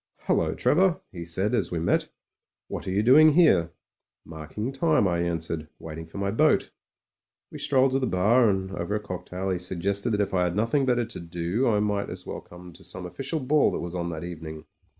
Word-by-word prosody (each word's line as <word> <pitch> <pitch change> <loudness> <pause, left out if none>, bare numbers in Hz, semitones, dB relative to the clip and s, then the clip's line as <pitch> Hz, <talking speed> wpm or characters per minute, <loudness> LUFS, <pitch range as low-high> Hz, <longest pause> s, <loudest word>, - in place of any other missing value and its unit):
"Hullo! - - +1
Trevor," 180 +2 +3
he 85 -2 -7
said, 95 +6 -2
as 105 -8 +1
we 85 - -2
met. 80 +1 +1 0.6
What - - -6
are - - -1
you 100 +3 +1
doing 150 +6 +7
here?" 120 - +5 0.6
"Marking 80 - -5
time," 150 - +2
I 85 -1 0
answered. 80 -2 -2
"Waiting 80 0 -8
for 80 - -10
my 100 0 -1
boat." 110 - +2 0.8
We - - -8
strolled 135 -1 +3
to 135 - +1
the 130 - 0
bar, 110 +5 +4
and 95 -1 -1
over 95 +2 -3
a - - 0
cocktail 95 -1 -5
he 90 - -1
suggested 95 +5 -2
that 105 - 0
if 100 - 0
I 90 -1 +2
had 85 - -2
nothing 115 +6 +1
better 120 -2 +2
to 115 - -8
do 85 +8 -1
I 105 -3 +2
might 105 -1 -1
as - - -7
well - - -6
come 90 0 -13
to - - -16
some 90 +1 -5
official 135 - -3
ball 145 +3 +3
that - - -2
was 85 0 -5
on 85 -1 -2
that 80 -1 -5
evening. 80 -3 -7
95 Hz, 210 wpm, -26 LUFS, 85-120 Hz, 0.8 s, doing